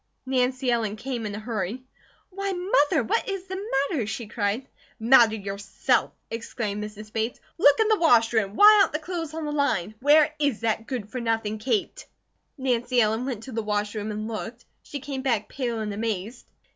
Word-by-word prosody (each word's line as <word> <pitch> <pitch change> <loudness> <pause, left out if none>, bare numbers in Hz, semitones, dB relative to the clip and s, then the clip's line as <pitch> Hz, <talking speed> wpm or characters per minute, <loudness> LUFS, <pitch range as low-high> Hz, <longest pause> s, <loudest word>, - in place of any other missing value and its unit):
Nancy 255 0 +1
Ellen 220 -3 0
came 235 -1 -4
in 205 - -5
a - - -5
hurry. 220 +1 -4 0.5
"Why, 395 +1 -3
Mother, 320 - +2
what 455 - 0
is 390 -2 -3
the 380 +1 -5 0.3
matter?" 255 - -1
she 230 +2 -4
cried. 215 +3 -2 0.3
"Matter, 230 -1 +6
yourself!" 200 -1 -1 0.2
exclaimed 220 -2 -4
Mrs. 210 0 -9
Bates. 225 +2 -2 0.2
"Look 285 +1 +6
in 440 - +4
the 435 -1 +3
wash 240 -9 +4
room! 210 -3 +1
Why 420 0 +8
aren't - - +2
the - - +1
clothes 325 -1 -5
on 320 -1 -4
the 295 - -3
line? 250 -10 0
Where 300 +2 +5
is 285 -7 0
that 225 0 -1
good 230 -6 -5
for 255 - -4
nothing 225 -2 -1
Kate?" 235 - -2 0.5
Nancy 250 -2 +1
Ellen 220 +2 +2
went 235 -5 -4
to 265 - -8
the 225 -1 -2
wash 210 -1 -1
room 215 -1 -4
and 215 0 -4
looked. 230 +2 -6 0.2
She 285 - -7
came 275 -1 -4
back 235 -6 0
pale 240 -4 -3
and 210 -1 -3
amazed. 220 +2 -4
235 Hz, 190 wpm, -25 LUFS, 215-285 Hz, 0.5 s, Why